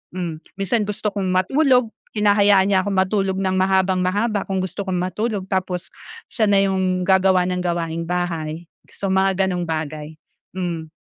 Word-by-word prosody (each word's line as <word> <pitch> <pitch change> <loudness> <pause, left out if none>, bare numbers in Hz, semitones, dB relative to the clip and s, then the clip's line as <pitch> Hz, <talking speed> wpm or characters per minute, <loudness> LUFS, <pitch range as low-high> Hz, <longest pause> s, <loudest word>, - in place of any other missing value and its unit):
hmm, 175 -3 -3 0.2
minsan 205 +3 +1
gusto 210 +1 -3
kong 200 -2 -3
matulog, 250 +6 +3 0.3
hinahayaan 205 -2 +4
niya 190 - +4
akong 200 0 -2
matulog 190 0 0
ng 190 -1 0
mahabang-mahaba 190 +3 +1
kung 190 -1 -1
gusto 190 +2 -4
kong 180 -1 -1
matulog. 200 +2 -2
Tapos 185 -2 -2 0.4
siya 220 -3 +1
na 200 - +5
'yong 185 -2 0
gagawa 190 -1 +4
ng 180 0 -1
gawaing 170 -1 -2
bahay, 170 -2 -3 0.2
so 200 - -4
mga 190 0 +2
ganong 180 -1 -2
bagay, 155 -1 -4 0.4
mm. 170 -3 -4
190 Hz, 150 wpm, -21 LUFS, 180-200 Hz, 0.4 s, na